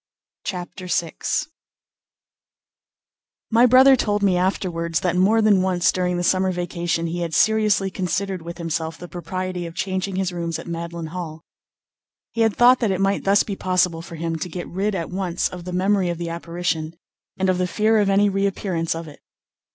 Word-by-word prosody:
CHAPTER 180 Hz, 0 st, -5 dB
VI 170 Hz, -2 st, 0 dB, 2.4 s
My 235 Hz, +2 st, +6 dB
brother 260 Hz, +2 st, +7 dB
told 205 Hz, -4 st, 0 dB
me 190 Hz, -2 st, +3 dB
afterwards 175 Hz, -3 st, -1 dB
that 180 Hz, -1 st, 0 dB
more 210 Hz, +5 st, +3 dB
than 205 Hz, -3 st, +5 dB
once 185 Hz, -2 st, +2 dB
during 180 Hz, -1 st, -1 dB
the 175 Hz, -, -1 dB
summer 185 Hz, +1 st, +2 dB
vacation 175 Hz, -1 st, -2 dB
he 170 Hz, +1 st, -3 dB
had 170 Hz, -2 st, -2 dB
seriously 215 Hz, -3 st, +3 dB
considered 190 Hz, 0 st, -2 dB
with 170 Hz, +1 st, -8 dB
himself 165 Hz, -1 st, -3 dB
the 175 Hz, -, -9 dB
propriety 185 Hz, 0 st, -4 dB
of 165 Hz, -, -10 dB
changing 190 Hz, 0 st, -2 dB
his 190 Hz, -1 st, -1 dB
rooms 170 Hz, -1 st, -3 dB
at -, -, -9 dB
Magdalen 170 Hz, -1 st, -5 dB
Hall. 165 Hz, -3 st, -6 dB, 0.9 s
He 230 Hz, -, -2 dB
had 225 Hz, -2 st, +3 dB
thought 245 Hz, +1 st, +6 dB
that 225 Hz, -, +1 dB
it 190 Hz, -1 st, 0 dB
might 195 Hz, 0 st, 0 dB
thus 200 Hz, +1 st, +4 dB
be 200 Hz, -, -4 dB
possible 180 Hz, -3 st, +1 dB
for 165 Hz, -, -9 dB
him 165 Hz, 0 st, -3 dB
to 170 Hz, +3 st, -5 dB
get 175 Hz, +1 st, -6 dB
rid 195 Hz, +3 st, -1 dB
at 170 Hz, -2 st, -4 dB
once 180 Hz, -2 st, -1 dB
of 180 Hz, -1 st, -9 dB
the 180 Hz, -, -5 dB
memory 190 Hz, 0 st, +1 dB
of 170 Hz, -, -2 dB
the 170 Hz, 0 st, -4 dB
apparition, 165 Hz, -1 st, -3 dB, 0.4 s
and 190 Hz, -, 0 dB
of 185 Hz, -1 st, +1 dB
the 180 Hz, -, +1 dB
fear 215 Hz, +4 st, +2 dB
of 205 Hz, -1 st, +2 dB
any 200 Hz, +1 st, +4 dB
reappearance 195 Hz, -4 st, -1 dB
of 165 Hz, 0 st, -6 dB
it. 145 Hz, -, -12 dB
180 Hz, 185 wpm, -22 LUFS, 170-195 Hz, 2.4 s, brother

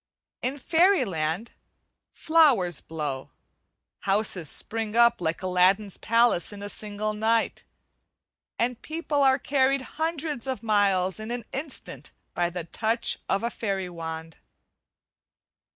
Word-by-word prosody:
In 260 Hz, +3 st, -2 dB
fairy 340 Hz, +2 st, +3 dB
land, 165 Hz, +3 st, -2 dB, 0.6 s
flowers 265 Hz, -, +3 dB
blow, 145 Hz, -5 st, -5 dB, 0.7 s
houses 195 Hz, -5 st, 0 dB
spring 225 Hz, -1 st, -1 dB
up 235 Hz, -4 st, +5 dB
like 165 Hz, +1 st, -2 dB
Aladdin's 185 Hz, +2 st, +2 dB
palace 230 Hz, -6 st, +2 dB
in 200 Hz, -1 st, -9 dB
a 205 Hz, -, -4 dB
single 210 Hz, 0 st, -4 dB
night, 225 Hz, +2 st, 0 dB, 0.9 s
and 245 Hz, 0 st, -1 dB
people 310 Hz, -2 st, -2 dB
are 265 Hz, -1 st, +5 dB
carried 270 Hz, 0 st, +1 dB, 0.2 s
hundreds 310 Hz, -5 st, -1 dB
of 260 Hz, -2 st, -3 dB
miles 200 Hz, -3 st, +2 dB
in 215 Hz, +1 st, -6 dB
an 240 Hz, -2 st, -4 dB
instant 275 Hz, +2 st, -5 dB, 0.2 s
by 175 Hz, 0 st, 0 dB
the 175 Hz, 0 st, -5 dB
touch 220 Hz, +7 st, 0 dB
of 195 Hz, +3 st, +1 dB
a 235 Hz, -, -1 dB
fairy 195 Hz, -4 st, -3 dB
wand. 160 Hz, -1 st, -7 dB
215 Hz, 120 wpm, -26 LUFS, 180-260 Hz, 0.9 s, up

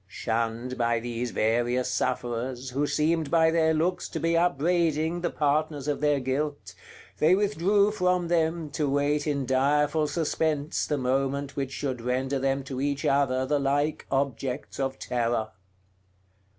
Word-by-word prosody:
Shunned 115 Hz, +4 st, -3 dB
by 120 Hz, -1 st, +2 dB
these 120 Hz, +1 st, -3 dB
various 120 Hz, +3 st, +1 dB
sufferers, 125 Hz, +1 st, -2 dB
who 145 Hz, +3 st, 0 dB
seemed 155 Hz, 0 st, +1 dB
by 160 Hz, -1 st, +4 dB
their 160 Hz, -1 st, +3 dB
looks 170 Hz, +3 st, 0 dB
to -, -, -4 dB
be 165 Hz, 0 st, +1 dB
upbraiding 165 Hz, 0 st, +1 dB
the 175 Hz, -, 0 dB
partners 150 Hz, -1 st, 0 dB
of 145 Hz, -1 st, -1 dB
their 145 Hz, -1 st, +2 dB
guilt, 130 Hz, -6 st, -3 dB, 0.5 s
they 160 Hz, +4 st, +5 dB
withdrew 200 Hz, +1 st, +2 dB
from 180 Hz, -4 st, +1 dB
them, 165 Hz, -2 st, 0 dB
to 150 Hz, -2 st, -1 dB
wait 145 Hz, +2 st, +1 dB
in 140 Hz, -2 st, 0 dB
direful 150 Hz, +4 st, +2 dB
suspense 155 Hz, -1 st, -1 dB
the 150 Hz, -, 0 dB
moment 135 Hz, +2 st, -1 dB
which 135 Hz, -2 st, -3 dB
should 130 Hz, -3 st, -3 dB
render 130 Hz, +3 st, -1 dB
them 135 Hz, +1 st, 0 dB
to 130 Hz, -1 st, -5 dB
each 140 Hz, 0 st, -1 dB
other 130 Hz, -2 st, +2 dB
the 145 Hz, +2 st, +1 dB
like 145 Hz, +2 st, 0 dB
objects 135 Hz, 0 st, -2 dB
of 135 Hz, 0 st, -1 dB
terror. 120 Hz, -3 st, -1 dB
140 Hz, 150 wpm, -27 LUFS, 130-160 Hz, 0.5 s, they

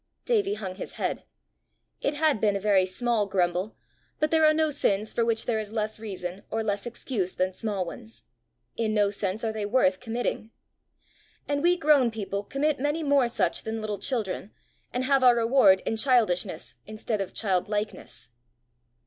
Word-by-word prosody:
Davie 415 Hz, -4 st, +1 dB
hung 190 Hz, -, -5 dB
his 185 Hz, -, -7 dB
head. -, -, -3 dB, 0.8 s
It 285 Hz, -, 0 dB
had 300 Hz, -6 st, +2 dB
been 205 Hz, -2 st, +3 dB
a -, -, 0 dB
very 195 Hz, -2 st, +3 dB
small 225 Hz, +1 st, 0 dB
grumble, 185 Hz, +2 st, 0 dB, 0.4 s
but 305 Hz, 0 st, +1 dB
there 320 Hz, -1 st, +4 dB
are -, -, +6 dB
no 310 Hz, 0 st, +1 dB
sins 215 Hz, -7 st, 0 dB
for 235 Hz, -, +1 dB
which 230 Hz, -1 st, 0 dB
there 225 Hz, -2 st, 0 dB
is 215 Hz, -1 st, -5 dB
less 220 Hz, -1 st, -2 dB
reason 190 Hz, -3 st, -6 dB
or 225 Hz, 0 st, -1 dB
less 205 Hz, +1 st, -1 dB
excuse 230 Hz, -6 st, -3 dB
than 185 Hz, +1 st, 0 dB
small 200 Hz, -2 st, -2 dB
ones: 225 Hz, +6 st, -9 dB, 0.5 s
in 220 Hz, -1 st, -1 dB
no 205 Hz, -1 st, +3 dB
sense 200 Hz, +1 st, -3 dB
are 225 Hz, -, 0 dB
they 215 Hz, -1 st, -4 dB
worth 205 Hz, -4 st, +2 dB
committing. 225 Hz, -1 st, -3 dB, 1.0 s
And 285 Hz, 0 st, 0 dB
we 350 Hz, +2 st, +3 dB
grown 295 Hz, -6 st, +4 dB
people 200 Hz, -2 st, -4 dB
commit 280 Hz, +7 st, 0 dB
many 295 Hz, +4 st, 0 dB
more 280 Hz, -4 st, +3 dB
such 235 Hz, -, 0 dB
than 220 Hz, 0 st, -4 dB
little 210 Hz, -2 st, -4 dB
children, 210 Hz, -5 st, -2 dB, 0.4 s
and 250 Hz, -, -1 dB
have 270 Hz, 0 st, +3 dB
our 245 Hz, -1 st, +7 dB
reward 230 Hz, -5 st, +5 dB
in 225 Hz, -, -1 dB
childishness 220 Hz, -7 st, +1 dB
instead 215 Hz, 0 st, -3 dB
of 195 Hz, -, -4 dB
childlikeness. 205 Hz, -, -2 dB
220 Hz, 175 wpm, -27 LUFS, 200-260 Hz, 1.0 s, our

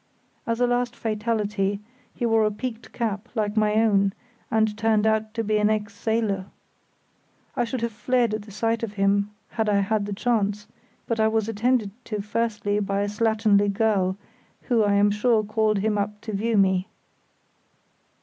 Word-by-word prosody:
As 230 Hz, 0 st, -1 dB
a 245 Hz, -, +4 dB
last 245 Hz, 0 st, 0 dB
fatality, 210 Hz, -3 st, -1 dB, 0.4 s
he 240 Hz, -, -2 dB
wore 225 Hz, -1 st, +3 dB
a 215 Hz, -, +3 dB
peaked 230 Hz, +2 st, -6 dB
cap 220 Hz, -1 st, -3 dB
like 210 Hz, -1 st, -1 dB
my 215 Hz, -1 st, +2 dB
own, 200 Hz, -3 st, +3 dB, 0.4 s
and 220 Hz, -1 st, +2 dB
turned 220 Hz, -1 st, +2 dB
out 220 Hz, 0 st, +1 dB
to 230 Hz, -, -1 dB
be 215 Hz, 0 st, +1 dB
an 210 Hz, 0 st, +3 dB
ex 210 Hz, -1 st, -1 dB
sailor. 205 Hz, -3 st, -1 dB, 1.1 s
I -, -, +1 dB
should 240 Hz, +1 st, -4 dB
have 235 Hz, 0 st, -1 dB
fled 240 Hz, +1 st, +1 dB
at 215 Hz, -, -2 dB
the 205 Hz, -, -13 dB
sight 225 Hz, +2 st, -1 dB
of 225 Hz, -3 st, -4 dB
him 200 Hz, 0 st, +2 dB, 0.2 s
had 220 Hz, -2 st, -1 dB
I 200 Hz, -1 st, +3 dB
had 205 Hz, +1 st, 0 dB
the 205 Hz, -, -3 dB
chance, 210 Hz, -2 st, 0 dB, 0.4 s
but 230 Hz, -1 st, -2 dB
I 220 Hz, -, +4 dB
was 220 Hz, -1 st, 0 dB
attended 225 Hz, -1 st, +1 dB
to 210 Hz, -2 st, -3 dB
first 215 Hz, +1 st, -2 dB
by 205 Hz, -1 st, 0 dB
a 205 Hz, -, 0 dB
slatternly 210 Hz, -1 st, +2 dB
girl 195 Hz, -3 st, +1 dB, 0.5 s
who, 235 Hz, -3 st, +2 dB
I 205 Hz, -1 st, +2 dB
am 205 Hz, +1 st, +4 dB
sure, 215 Hz, +1 st, +2 dB
called 215 Hz, 0 st, +1 dB
him 210 Hz, +1 st, 0 dB
up 210 Hz, +1 st, -3 dB
to 215 Hz, -, -6 dB
view 220 Hz, +2 st, 0 dB
me. 190 Hz, -1 st, +3 dB
215 Hz, 180 wpm, -24 LUFS, 205-225 Hz, 1.1 s, a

